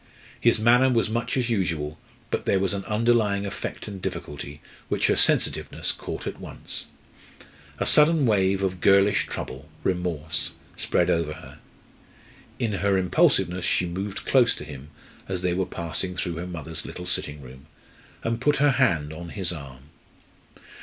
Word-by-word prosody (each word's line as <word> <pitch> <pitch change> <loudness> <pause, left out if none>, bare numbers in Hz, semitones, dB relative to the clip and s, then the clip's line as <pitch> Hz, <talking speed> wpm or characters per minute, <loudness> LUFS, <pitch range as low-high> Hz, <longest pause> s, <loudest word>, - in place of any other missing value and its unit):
His 120 - +4
manner 120 +4 +5
was 115 -3 +1
much 115 +3 -1
as 125 -2 0
usual, 80 -7 -1 0.3
but - - -1
there 100 - +3
was 95 0 +1
an 100 -1 -3
underlying 105 -2 +2
effort 100 +2 -5
and 100 -3 -7
difficulty 75 -2 -5 0.3
which - - +1
her - - +3
sensitiveness - - +2
caught - - -6
at - - -5
once. - - -6 0.9
A - - -1
sudden 150 -1 +5
wave 100 -3 +2
of 95 -2 -1
girlish 100 +1 +4
trouble 70 +4 -6
remorse 90 -4 -1 0.2
swept - - +1
over 80 -2 0
her. - - -12 1.0
In 115 -3 -1
her 100 +1 +2
impulsiveness 90 -1 +2
she 90 - +1
moved 95 +3 -4
close 125 -3 +4
to - - -8
him 70 -1 -9 0.4
as 90 -2 -3
they 90 -1 +1
were 95 0 0
passing 85 +1 -3
through 85 -2 -3
her 90 +1 -4
mother's 80 -2 -6
little 90 - -7
sitting 75 -4 -1
room, 65 +2 -13 0.6
and 115 +1 -1
put 150 +2 +3
her 145 +1 +4
hand 85 - +2
on 85 +2 -8
his 95 -1 0
arm. 70 -6 -8
95 Hz, 160 wpm, -25 LUFS, 80-110 Hz, 1.0 s, manner